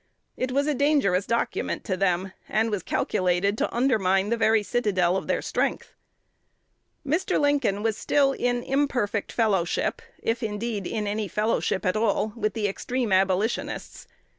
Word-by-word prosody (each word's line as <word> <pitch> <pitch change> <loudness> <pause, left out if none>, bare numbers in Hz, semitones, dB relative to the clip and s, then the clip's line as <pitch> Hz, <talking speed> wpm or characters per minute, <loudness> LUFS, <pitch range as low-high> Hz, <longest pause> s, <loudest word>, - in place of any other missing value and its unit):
It 255 0 -2
was 280 +2 +1
a 300 - +1
dangerous 270 -10 +2
document 235 0 -1
to 190 - -1
them, 185 0 0 0.2
and 220 +1 +1
was 205 -3 -1
calculated 185 +3 0
to - - 0
undermine 205 -6 +2
the 235 - +2
very 220 -2 +3
citadel 195 -6 +1
of 190 - -3
their - - 0
strength. - - -2 1.1
Mr. 335 +7 +1
Lincoln 280 -9 +1
was 225 -1 0
still 280 -2 +2
in 245 -2 -1
imperfect 250 -7 0
fellowship 200 -7 0 0.2
if, 230 +1 -2
indeed, 215 -2 -3
in 215 -2 -2
any 205 +1 -2
fellowship 210 0 0
at 185 - +1
all 215 -1 +1
with 215 -2 -2
the 215 -2 0
extreme 245 +3 -2
Abolitionists. 190 +4 0
215 Hz, 150 wpm, -25 LUFS, 195-245 Hz, 1.1 s, very